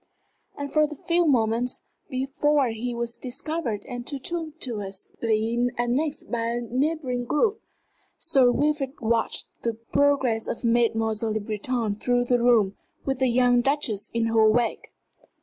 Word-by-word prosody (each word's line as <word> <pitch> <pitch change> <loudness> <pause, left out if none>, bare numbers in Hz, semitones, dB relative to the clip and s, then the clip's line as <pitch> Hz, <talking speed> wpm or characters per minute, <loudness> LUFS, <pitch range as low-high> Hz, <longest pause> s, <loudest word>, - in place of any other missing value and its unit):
And 285 -1 -5
for 305 - +4
a 305 - +4
few 340 +3 +1
moments, 235 -2 +1 0.3
before 275 +1 +1
he 235 +2 -4
was 235 0 -1
discovered 255 -3 -2
and 245 -1 -7
tumultuously 240 - -2
annexed 260 +6 -1
by 235 -2 0
a 235 +1 -1
neighboring 255 0 -1
group, 410 - +1 0.6
Sir 265 -6 +4
Wilfrid 290 0 0
watched 230 0 0 0.2
the 230 -1 -1
progress 250 -1 +1
of - - -4
Mademoiselle 225 -2 +1
Le 220 - 0
Breton 215 +1 -2
through 245 +2 +1
the 245 0 +2
room, 225 -5 +4 0.3
with 270 -2 -1
the 260 - +3
young 245 0 +4
Duchess 260 -6 0
in 230 0 0
her 225 -1 +4
wake. 230 +1 0
245 Hz, 135 wpm, -25 LUFS, 230-275 Hz, 0.6 s, for